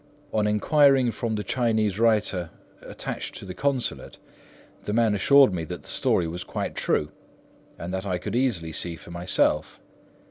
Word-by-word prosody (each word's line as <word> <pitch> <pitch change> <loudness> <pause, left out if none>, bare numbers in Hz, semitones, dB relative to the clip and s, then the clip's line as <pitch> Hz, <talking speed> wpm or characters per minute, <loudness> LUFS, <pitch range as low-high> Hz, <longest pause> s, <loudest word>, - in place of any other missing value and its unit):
On 105 -1 +2
enquiring 135 +4 +4
from 115 -1 -3
the 105 - -3
Chinese 110 -5 0
writer 105 -6 +2 0.3
attached - - -5
to - - -8
the 95 - -6
Consulate, 135 +2 -2 0.7
the 105 - -2
man 115 -1 +3
assured 135 +3 +5
me 85 -2 -2
that - - -7
the - - -14
story 85 - +1
was 85 +2 -5
quite - - -4
true - - 0 0.7
and 85 +2 -6
that 95 +1 -3
I 90 -2 0
could 105 +4 -5
easily 110 -11 0
see 85 +2 -2
for 85 - -13
myself. 85 +1 0
105 Hz, 165 wpm, -25 LUFS, 90-120 Hz, 0.7 s, assured